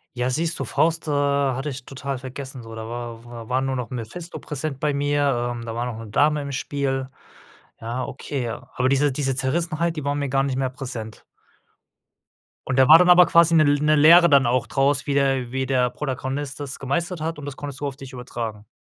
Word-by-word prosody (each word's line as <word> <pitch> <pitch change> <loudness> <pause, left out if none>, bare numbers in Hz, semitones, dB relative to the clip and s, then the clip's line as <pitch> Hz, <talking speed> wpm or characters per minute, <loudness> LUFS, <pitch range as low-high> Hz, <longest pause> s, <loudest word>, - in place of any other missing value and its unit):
Ja, 125 +1 0
siehst 160 +5 -1
du, - - -1
Faust, 165 0 0
äh, - - 0
hatte 140 -1 +1
ich 130 -2 -7
total 135 0 -5
vergessen 130 0 -8
so. 115 0 -10
Da 110 0 -6
war 120 -1 -6
war 115 -2 -10
war 130 +1 +1
nur 135 0 -1
noch 125 -4 -4
Mephisto 130 +9 -7
präsent 150 -2 -5
bei 150 0 0
mir, 140 -4 0
ähm, 115 - -7
da 115 -1 -5
war 120 +1 -2
noch 120 -3 -5
'ne 115 - -8
Dame 150 +6 +2
im 140 0 -5
Spiel. 135 -1 -2 0.7
Ja, 120 +3 -3
okay, 135 0 -5
ja. 115 - -6
Aber 130 - +1
diese 140 +1 +2
diese 135 -1 -1
Zerrissenheit, 165 +5 -1
die 150 - -4
war 140 0 0
mir 145 -1 -2
gar 135 +1 +2
nicht 135 -2 -2
mehr 130 -1 0
präsent. 125 -5 -7 1.5
Und 130 - +1
da 130 +1 +5
war 160 - +11
dann 180 - +4
aber 180 0 +8
quasi 170 0 +5
'ne 155 - +6
L 145 -1 +3
'ne 150 0 +4
Lehre 170 +4 +8
dann 140 -2 +5
auch 125 +1 +1
draus, 140 +1 +1
wie 140 - 0
der 135 -3 +1
wie 130 0 -1
der 125 -1 +1
Protagonist 135 +1 -4
das 140 -2 -5
gemeistert 170 +6 -2
hat, 160 -1 -3
und 145 - -8
das 145 -2 -6
konntest 140 -2 -7
du 145 - -2
auf 135 - -5
dich 135 -1 -10
übertragen? 115 -4 -6
135 Hz, 225 wpm, -23 LUFS, 125-145 Hz, 1.5 s, war